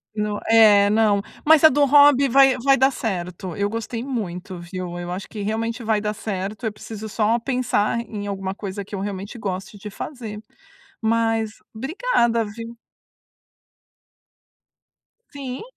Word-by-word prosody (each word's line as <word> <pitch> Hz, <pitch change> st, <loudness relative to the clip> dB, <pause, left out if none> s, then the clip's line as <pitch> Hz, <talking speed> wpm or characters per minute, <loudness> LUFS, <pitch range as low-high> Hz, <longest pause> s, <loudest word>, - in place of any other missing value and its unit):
No 210 Hz, -1 st, -2 dB
é, 210 Hz, -3 st, +6 dB
não, 210 Hz, -2 st, +3 dB, 0.2 s
mas 315 Hz, 0 st, +5 dB
a 315 Hz, -, +10 dB
do 290 Hz, +1 st, +3 dB
hobby 285 Hz, -1 st, +6 dB
vai 270 Hz, 0 st, +6 dB
vai 275 Hz, +2 st, +4 dB
dar 265 Hz, +2 st, +4 dB
certo, 180 Hz, -6 st, -4 dB
eu 200 Hz, 0 st, 0 dB
gostei 230 Hz, +2 st, -4 dB
muito, 190 Hz, -8 st, -5 dB
viu, 175 Hz, 0 st, -6 dB
eu 175 Hz, 0 st, -5 dB
acho 185 Hz, +2 st, -5 dB
que 210 Hz, -, -7 dB
realmente 225 Hz, +3 st, -2 dB
vai 220 Hz, -1 st, +1 dB
dar 210 Hz, 0 st, -2 dB
certo, 205 Hz, +1 st, -4 dB
eu -, -, -2 dB
preciso 215 Hz, 0 st, -8 dB
só 225 Hz, +2 st, +1 dB
pensar 240 Hz, -3 st, 0 dB
em 210 Hz, -3 st, -6 dB
alguma 195 Hz, -1 st, -3 dB
coisa 195 Hz, -1 st, -6 dB
que 205 Hz, -, -16 dB
eu 195 Hz, -, -3 dB
realmente 200 Hz, +3 st, -5 dB
goste 190 Hz, -1 st, -5 dB
de 205 Hz, +1 st, -8 dB
fazer, 220 Hz, -1 st, -7 dB, 0.6 s
mas 225 Hz, -1 st, 0 dB
obrigada, 255 Hz, -, +1 dB
viu. 230 Hz, +2 st, -7 dB, 2.6 s
Sim. 265 Hz, -2 st, -6 dB
220 Hz, 150 wpm, -22 LUFS, 200-235 Hz, 2.6 s, a